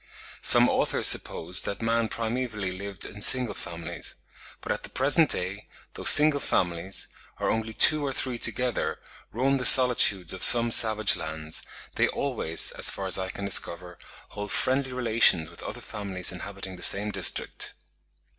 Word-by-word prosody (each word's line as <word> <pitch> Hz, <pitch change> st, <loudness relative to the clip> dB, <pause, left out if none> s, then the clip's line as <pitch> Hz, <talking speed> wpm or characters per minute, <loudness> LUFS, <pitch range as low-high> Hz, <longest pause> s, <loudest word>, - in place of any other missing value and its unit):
Some -, -, +5 dB
authors -, -, -1 dB
suppose 90 Hz, +4 st, +2 dB
that 100 Hz, -, -7 dB
man 115 Hz, 0 st, -2 dB
primevally 110 Hz, -5 st, -6 dB
lived 100 Hz, +1 st, -6 dB
in 105 Hz, -, -12 dB
single 125 Hz, +1 st, +4 dB
families; 85 Hz, -1 st, -9 dB, 0.5 s
but -, -, -6 dB
at -, -, -5 dB
the -, -, -11 dB
present 145 Hz, +4 st, +1 dB
day, 95 Hz, +3 st, -1 dB, 0.3 s
though -, -, -11 dB
single 150 Hz, -1 st, +7 dB
families, 90 Hz, -4 st, -3 dB, 0.3 s
or -, -, -2 dB
only 110 Hz, 0 st, -4 dB
two 150 Hz, +6 st, +3 dB
or 140 Hz, -, -4 dB
three 130 Hz, -2 st, -5 dB
together, 125 Hz, -2 st, -2 dB, 0.3 s
roam 135 Hz, +4 st, -1 dB
the -, -, -5 dB
solitudes 120 Hz, -9 st, +5 dB
of 95 Hz, -, -10 dB
some 120 Hz, -1 st, +3 dB
savage 110 Hz, -2 st, +4 dB
lands, 80 Hz, 0 st, -5 dB, 0.4 s
they -, -, +1 dB
always, 110 Hz, -, +1 dB
as -, -, +4 dB
far 95 Hz, -, -7 dB
as 95 Hz, 0 st, +1 dB
I 95 Hz, 0 st, -6 dB
can 100 Hz, -, -8 dB
discover, 90 Hz, -2 st, -1 dB, 0.3 s
hold 105 Hz, 0 st, -8 dB
friendly 130 Hz, 0 st, -2 dB
relations 110 Hz, -10 st, 0 dB
with 85 Hz, -, -14 dB
other -, -, -9 dB
families 100 Hz, -3 st, -2 dB
inhabiting 95 Hz, 0 st, -9 dB
the -, -, -16 dB
same 105 Hz, +2 st, +2 dB
district. 95 Hz, -3 st, -1 dB
105 Hz, 160 wpm, -24 LUFS, 95-125 Hz, 0.5 s, single